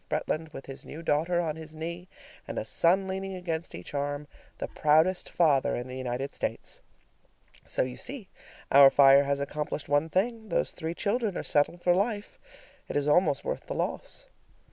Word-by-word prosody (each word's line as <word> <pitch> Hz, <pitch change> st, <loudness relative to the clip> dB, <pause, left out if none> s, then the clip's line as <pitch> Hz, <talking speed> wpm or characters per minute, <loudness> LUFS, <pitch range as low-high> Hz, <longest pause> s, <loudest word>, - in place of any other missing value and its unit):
Bretland 155 Hz, +1 st, -2 dB
with 135 Hz, -, -9 dB
his 135 Hz, -1 st, -9 dB
new 160 Hz, +3 st, -9 dB
daughter 165 Hz, +3 st, +1 dB
on 160 Hz, -3 st, -1 dB
his 160 Hz, 0 st, -10 dB
knee 170 Hz, +3 st, -6 dB, 0.4 s
and -, -, -5 dB
a -, -, -2 dB
son 190 Hz, +3 st, +2 dB
leaning 190 Hz, 0 st, -4 dB
against 170 Hz, -2 st, -4 dB
each 90 Hz, +9 st, -9 dB
arm, 145 Hz, +1 st, -2 dB, 0.3 s
the -, -, -4 dB
proudest 160 Hz, +5 st, +2 dB
father 150 Hz, -6 st, +3 dB
in 120 Hz, +1 st, -4 dB
the 130 Hz, -, -7 dB
United 130 Hz, +1 st, -3 dB
States. -, -, -4 dB, 0.9 s
So, -, -, +1 dB
you 125 Hz, -1 st, -6 dB
see, 250 Hz, -6 st, -5 dB, 0.4 s
our 140 Hz, 0 st, +9 dB
fire 140 Hz, 0 st, +6 dB
has 140 Hz, 0 st, 0 dB
accomplished 150 Hz, +1 st, -4 dB
one 145 Hz, +3 st, +2 dB
thing: 220 Hz, +4 st, -1 dB
those -, -, 0 dB
three 160 Hz, +1 st, -4 dB
children 210 Hz, 0 st, -1 dB
are -, -, -3 dB
settled 160 Hz, +4 st, +1 dB
for 175 Hz, -, +4 dB
life. 205 Hz, +2 st, -1 dB, 0.5 s
It -, -, -5 dB
is 145 Hz, 0 st, +1 dB
almost 150 Hz, -2 st, +3 dB
worth -, -, -4 dB
the -, -, -4 dB
loss. -, -, -4 dB
160 Hz, 180 wpm, -28 LUFS, 140-180 Hz, 0.9 s, our